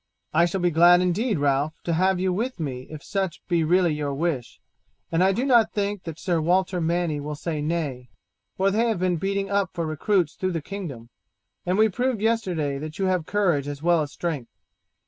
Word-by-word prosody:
"I 170 +2 +5
shall 175 +2 -2
be 175 0 +2
glad 175 +2 +6
indeed, 195 +4 +1
Ralph, 145 +1 +1
to 170 - -1
have 185 +2 +2
you 185 0 +1
with 235 +4 -2
me 130 -5 -4
if 155 -2 -9
such 190 -4 -2
be 170 -2 +2
really 175 0 +3
your 145 -2 -2
wish, 145 -5 -2 0.5
and 165 +2 +3
I 190 - +4
do 240 +7 -1
not 240 -5 +4
think 205 -2 -2
that 165 -2 -6
Sir 175 -3 0
Walter 180 +2 +1
Manny 165 -2 0
will 150 +1 -5
say 155 0 -3
nay, 145 -6 -3 0.5
for 195 +1 +2
they 225 +4 +2
have 225 -4 0
been 180 -1 +1
beating 195 +3 -2
up 200 -2 +1
for 170 -2 -2
recruits 160 +1 0
through 185 -1 -2
the 165 - -1
kingdom, 145 - -7 0.6
and 180 +2 +1
we 220 +1 +5
proved 245 +3 -1
yesterday 180 -11 0
that 155 +4 -7
you 195 - 0
have 185 -4 0
courage 175 -9 +1
as 145 +1 -6
well 170 -1 +4
as 145 -1 -4
strength. 150 -9 -4
175 Hz, 205 wpm, -24 LUFS, 155-195 Hz, 0.6 s, glad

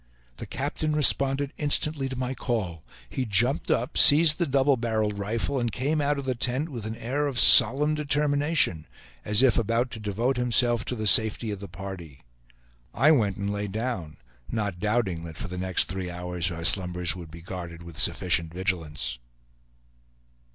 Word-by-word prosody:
The - - -8
captain 150 +2 -3
responded 140 -1 +1
instantly 145 -1 0
to 130 - -6
my 130 0 -3
call; 100 - -4 0.3
he 130 - -4
jumped 120 - 0
up, 125 +6 0
seized 155 +2 +7
the 170 - 0
double 135 +1 +2
barreled 110 -4 -2
rifle, 115 +6 -2
and 120 -2 -2
came 145 +6 -1
out 145 0 0
of 140 - -6
the 130 - -1
tent 130 +5 -2
with 115 -7 -7
an 110 - -5
air 140 +6 -2
of 135 -4 -4
solemn 140 +7 +7
determination, 145 - +1 0.4
as 105 +4 +3
if 125 -2 +3
about 115 +3 -1
to 110 - -8
devote 110 +5 -2
himself 120 -1 +2
to 125 - -4
the 110 -2 -5
safety 110 +1 +4
of 100 - -6
the 100 - -8
party. 85 -6 -9 0.7
I 145 +6 +4
went 105 -10 +1
and 100 0 -3
lay 105 0 -3
down, 100 -6 -5 0.3
not 100 -5 -3
doubting 105 -5 -1
that 80 -1 -10
for - - -6
the 90 0 -7
next 95 0 +1
three 95 0 -6
hours 90 0 -3
our 85 -1 -6
slumbers 90 -2 0
would 85 -3 -10
be 85 +1 -12
guarded 85 -2 -8
with 85 -2 -9
sufficient 85 -2 0
vigilance. 80 -9 -3
110 Hz, 175 wpm, -25 LUFS, 90-135 Hz, 0.7 s, seized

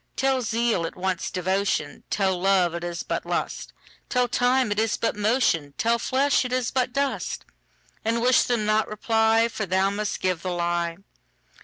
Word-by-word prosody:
Tell 265 -1 +1
zeal 230 -5 0
it - - -9
wants 185 0 -2
devotion; 190 +2 -1
Tell 190 -2 +1
love 185 -3 +3
it 170 0 -5
is 175 -1 -4
but - - -3
lust; - - -3 0.4
Tell 250 -1 +2
time 245 -1 +2
it 205 - 0
is 220 0 +1
but 230 - -1
motion; 205 - +1
Tell 235 +1 +1
flesh 275 +4 +2
it 250 - -5
is 255 -2 0
but 255 -1 0
dust:And 245 -4 -4
wish 255 0 +5
them 235 -4 0
not 215 +1 +2
reply, 225 +1 +2
For 215 -3 -4
thou 190 +2 +2
must 210 0 -3
give 185 -3 -1
the 185 0 -3
lie. 170 -1 -1
215 Hz, 170 wpm, -25 LUFS, 185-245 Hz, 0.4 s, wish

